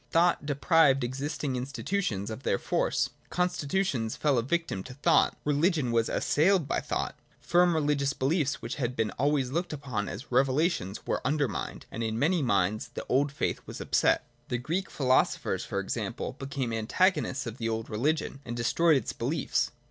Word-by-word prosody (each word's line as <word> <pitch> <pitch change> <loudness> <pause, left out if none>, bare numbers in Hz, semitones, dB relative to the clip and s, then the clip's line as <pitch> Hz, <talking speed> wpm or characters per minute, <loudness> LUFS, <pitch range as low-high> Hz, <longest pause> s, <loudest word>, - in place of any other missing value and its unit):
Thought 170 -3 +2
deprived 145 -2 +4
existing 135 +2 -3
institutions 125 - -2
of 110 - -6
their 100 - +1
force. - - 0 0.2
Constitutions 180 - 0
fell 145 -5 +2
a - - +1
victim 155 - -1
to 130 - -9
thought: 140 - +3
religion 150 -2 +2
was 115 -1 +2
assailed 170 0 +2
by - - 0
thought: - - -3 0.2
firm 175 -1 +3
religious 145 -2 +1
beliefs 140 +1 0
which - - -4
had 125 -3 -2
been 110 -3 0
always 140 -2 +1
looked 170 +2 -2
upon 130 -8 -3
as 115 +10 -8
revelations 130 - +1
were - - -1
undermined, 140 -6 -1
and 115 - -5
in 110 -1 -1
many 160 +7 +2
minds 105 -3 +1
the - - -5
old 140 +2 +2
faith 145 - -2
was - - -7
upset. - - +2 0.2
The 120 - -1
Greek 165 +10 -2
philo 130 -2 +4
sophers, - - -4
for - - -2
example, - - -3
became 135 -4 -3
antagonists 135 - +1
of 115 +2 -6
the 115 -1 -1
old 110 0 -2
religion, 140 +6 -1
and 120 -2 -5
destroyed 155 +7 +3
its 120 - -3
beliefs. 135 +5 0
140 Hz, 170 wpm, -29 LUFS, 120-155 Hz, 0.2 s, deprived